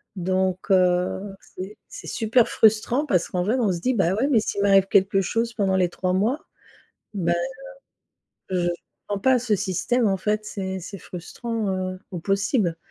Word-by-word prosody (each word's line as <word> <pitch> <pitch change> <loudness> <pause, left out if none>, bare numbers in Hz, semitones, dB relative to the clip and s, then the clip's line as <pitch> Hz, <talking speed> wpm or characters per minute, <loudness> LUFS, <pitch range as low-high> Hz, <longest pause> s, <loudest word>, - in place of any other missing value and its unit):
donc, 185 +1 -1
heu, 185 +1 +2 0.2
c'est 190 +3 -7
c'est - - -10
super 225 +2 +2
frustrant 220 +6 +3
parce 185 - +1
qu'en 180 -1 -1
vrai, 215 +6 +1
on 205 -6 +2
se 170 - -5
dit: 255 - +1
«Bah 190 -6 +2
ouais, 255 +8 +1
mais 230 - +5
s'il 200 - -2
m'arrive 195 -1 +5
quelque 195 0 +3
chose 230 +5 -1
pendant 195 -3 +1
les 180 -2 +2
3 180 0 -2
mois». 220 +10 +1 0.8
Bah, 175 -4 0 1.2
heu, 180 - +1
je - - +2 0.4
comprends 205 -1 -3
pas 260 +5 +4
ce 230 -3 0
système, 210 +5 0
en 195 - +2
fait, 210 +2 -1
c'est 190 -2 -4
c'est 195 +3 -8
frustrant, 215 +5 -5
heu, 185 0 -4
au 180 - -4
possible. 195 - 0
195 Hz, 175 wpm, -24 LUFS, 185-220 Hz, 1.2 s, mais